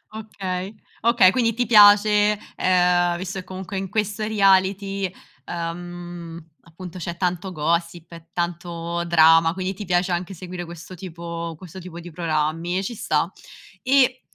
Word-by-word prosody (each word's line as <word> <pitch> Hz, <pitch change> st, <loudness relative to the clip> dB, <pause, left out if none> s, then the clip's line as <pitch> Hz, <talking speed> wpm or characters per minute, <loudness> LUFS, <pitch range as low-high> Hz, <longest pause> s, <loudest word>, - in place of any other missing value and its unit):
Okay, 195 Hz, -3 st, -5 dB, 0.3 s
okay, 230 Hz, -5 st, +5 dB
quindi 230 Hz, -1 st, +1 dB
ti 245 Hz, 0 st, 0 dB
piace, 210 Hz, -1 st, +6 dB, 0.2 s
ehm, 175 Hz, -1 st, +2 dB
visto 190 Hz, +1 st, -5 dB
che 185 Hz, -, -9 dB
comunque 190 Hz, +1 st, -6 dB
in 190 Hz, -1 st, -5 dB
questo 210 Hz, 0 st, -2 dB
reality, 195 Hz, -2 st, +2 dB, 0.4 s
uhm, 175 Hz, 0 st, -6 dB, 0.2 s
appunto 180 Hz, +2 st, -10 dB
c'è 170 Hz, +1 st, -5 dB
tanto 180 Hz, +1 st, -2 dB
gossip, 170 Hz, +1 st, -2 dB
e 165 Hz, 0 st, -12 dB
tanto 170 Hz, 0 st, -3 dB
drama, 165 Hz, 0 st, +5 dB
quindi 190 Hz, +1 st, -2 dB
ti 205 Hz, +2 st, -8 dB
piace 180 Hz, +1 st, +1 dB
anche 180 Hz, +2 st, -3 dB
seguire 175 Hz, 0 st, -7 dB
questo 170 Hz, +2 st, -10 dB
tipo 170 Hz, -2 st, -6 dB
questo 185 Hz, +1 st, -10 dB
tipo 175 Hz, -1 st, -9 dB
di 175 Hz, 0 st, -10 dB
programmi 165 Hz, +1 st, -1 dB
e 195 Hz, -, -1 dB
ci 235 Hz, -, -4 dB
sta. 175 Hz, -6 st, -1 dB, 0.5 s
E, 260 Hz, -1 st, +3 dB
180 Hz, 145 wpm, -23 LUFS, 170-195 Hz, 0.5 s, piace